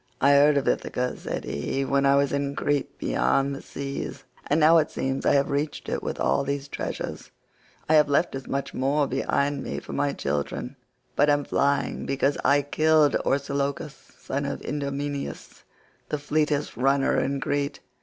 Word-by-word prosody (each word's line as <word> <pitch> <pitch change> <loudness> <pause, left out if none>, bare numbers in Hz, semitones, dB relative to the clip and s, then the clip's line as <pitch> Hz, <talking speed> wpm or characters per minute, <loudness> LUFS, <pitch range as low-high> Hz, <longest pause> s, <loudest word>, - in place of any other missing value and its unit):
"I 140 - +5
heard 145 +1 +6
of 140 - 0
Ithaca," 125 0 -1
said - - -5
he, 130 - -2
"when 140 0 +2
I 140 - +5
was 140 0 +2
in 140 0 -1
Crete 145 -1 -1
beyond 135 +1 +1
the 135 - -6
seas, 140 0 -6 0.2
and 150 - +2
now 165 +2 +7
it 155 - 0
seems 135 0 -2
I - - +5
have 140 0 +2
reached 145 +1 -2
it - - -2
with - - -4
all - - +2
these 140 0 -3
treasures. - - -5 0.6
I 155 - +3
have 150 -1 +5
left 145 +5 +2
as 135 -1 -6
much 140 0 -3
more 140 +3 +1
behind 140 +1 0
me - - -4
for - - -9
my 145 0 +1
children, 75 - -3 0.4
but 145 +1 +4
am 145 0 +3
flying 140 0 0
because 140 +1 +1
I 145 0 +4
killed 155 +1 +3
Orsilochus 140 +1 -1 0.2
son 140 +1 -3
of - - -4
Idomeneus, 140 0 -4 0.4
the 150 - -1
fleetest 150 0 0
runner 135 +2 +2
in 140 0 -1
Crete. 145 +1 -2
140 Hz, 175 wpm, -25 LUFS, 140-145 Hz, 0.6 s, now